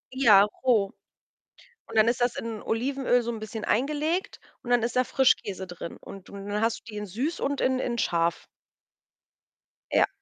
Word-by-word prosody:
Ja, 210 -7 +7 0.2
roh. 215 -6 +3 1.0
Und - - -8
dann 220 +1 +6
ist 240 - -1
das 245 0 +1
in 225 -2 -5
Olivenöl 250 +1 +1
so 235 0 -3
'n 225 - -5
bisschen 215 0 -6
eingelegt 300 - 0 0.2
und 240 - -8
dann 245 -2 +3
ist 240 +1 -1
da 255 - +3
Frischkäse 205 -8 +1
drin. 175 -2 -8
Und 195 -1 -12
und 200 0 -8
dann 210 +1 -1
hast 225 0 +1
du - - -44
die 210 - -7
in 210 - -4
süß 255 - -3
und 280 0 -1
in 260 0 +2
in 235 -2 -2
scharf. 170 -5 0 1.5
Ja. - - +4
230 Hz, 180 wpm, -27 LUFS, 205-255 Hz, 1.5 s, Ja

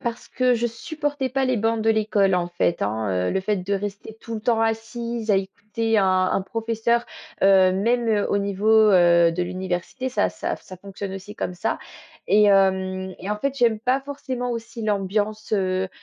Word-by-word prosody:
Parce 235 -1 -5
que 255 -1 +2
je 235 +1 0
supportais 290 +3 -3
pas 265 +1 0
les 255 -2 +1
bornes 225 +1 0
de 225 - +3
l'école, 210 -3 +2
en 175 -1 0
fait, 175 -1 0
hein, 100 -4 -1
heu, - - 0
le 190 - 0
fait 205 +1 0
de 190 +2 -2
rester 205 +2 -5
tout 230 - -7
le 215 - -4
temps 225 0 +1
assise 225 0 -2
à 200 - +5
écouter 210 +3 -1
un 195 - +3 0.3
un 195 - 0
professeur, 230 +2 -1 0.4
heu, 190 -1 +6
même, 230 +5 +1
heu, 210 -2 +2
au 200 - +2
niveau, 200 +1 -2 0.2
heu, 170 -2 +5
de 180 +1 -1
l'université, 185 +7 -3
ça 260 - +1
ça - - -3
f - - -21
ça 185 - -11
fonctionne 195 +1 -7
aussi 200 +2 -9
comme 180 - -4
ça. 225 +6 -2 0.5
Et 210 0 +5
hem 190 -1 +2
et 195 - -6
en 210 - 0
fait, 275 +4 -2
j'aime 230 -3 +3
pas 255 +4 +1
forcément 265 -3 -5
aussi 230 0 -6
l'ambiance, 210 +1 -1
heu, 190 -2 0
210 Hz, 200 wpm, -23 LUFS, 190-230 Hz, 0.5 s, heu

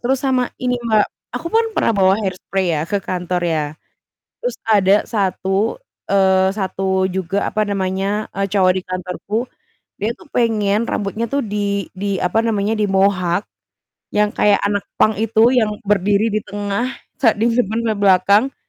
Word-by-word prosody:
Terus 260 +2 +1
sama 260 -2 +2 0.2
ini, 250 0 +1
Mbak, 215 -2 +4 0.3
aku 285 +7 -4
pun 455 +1 +3
pernah - - +2
bawa 190 0 +5
hair 190 -2 -1
spray 190 -2 -1
ya 150 - -1
ke 205 - 0
kantor 180 -1 -2
ya. 160 -3 0 0.8
Terus - - -3
ada 200 -2 +5
satu, 195 - -1 0.3
eee, 190 -1 +4
satu 190 -1 -1
juga, 190 +1 -2
apa 215 0 0
namanya, 195 +1 -2
eee, 195 0 0
cowok 185 -2 +4
di 185 - -2
kantorku, 185 +3 -5 0.6
dia 210 +3 0
tuh 340 - -17
pengen 220 -2 +2
rambutnya 210 +3 -2
tuh 280 - +2
di 200 -1 -2
di 200 0 -1
apa 180 +5 +1
namanya, 210 -2 0
di - - +3
mohak 190 -2 +2 0.7
yang 210 0 +3
kayak 205 -1 +4
anak 205 0 -1
punk 215 - +4
itu, 225 0 +1 0.2
yang 220 -3 +2 0.2
berdiri 205 +2 +2
di 215 - +1
tengah 205 +3 -2 0.3
sa 230 -5 +4
di 225 - +2
simpen 230 -1 0
sampe 220 -2 0
belakang 200 +6 +4
200 Hz, 165 wpm, -19 LUFS, 190-220 Hz, 0.8 s, bawa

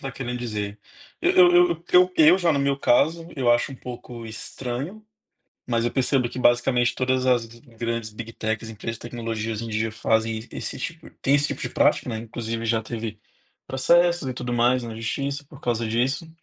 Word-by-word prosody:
tá 135 -1 -5
querendo 125 -2 -4
dizer, 105 -3 -4 0.4
eu - - +4
eu 175 -1 +6
eu 170 0 -3
eu 180 +1 +6
eu 160 +4 +7
já 170 -3 +2
no 140 - +1
meu 140 0 +1
caso, 160 +6 +2
eu 130 -4 +2
acho 120 +4 +2
um - - -7
pouco 120 -2 -8
estranho, 125 - -5 0.6
mas 115 -1 0
eu 120 - 0
percebo 130 -1 +2
que - - -8
basicamente 120 0 +3
todas 130 0 0
as 125 -2 +3
grandes 115 -1 -5
big 115 +1 -8
techs, 110 0 -3
empresas 115 +1 -5
de - - -25
tecnologia, 115 -2 -4
hoje 110 - -4
em 115 - -6
dia 110 +1 -1
fazem 110 0 0
esse - - -4
tipo 165 +5 -6
tem 140 +1 +4
esse 145 0 +2
tipo - - -5
de - - -3
prática, - - +2
né, 110 - -3
inclusive 115 0 -4
já 115 0 +1
teve 110 -2 -5 0.5
processos 170 +4 +3
e 130 - -2
tudo 125 0 -5
mais 120 +1 +2
na 115 -1 -6
justiça 140 +6 -3
por 145 -1 -14
causa 120 -2 -1
disso, 130 +8 0
120 Hz, 195 wpm, -24 LUFS, 115-140 Hz, 0.6 s, eu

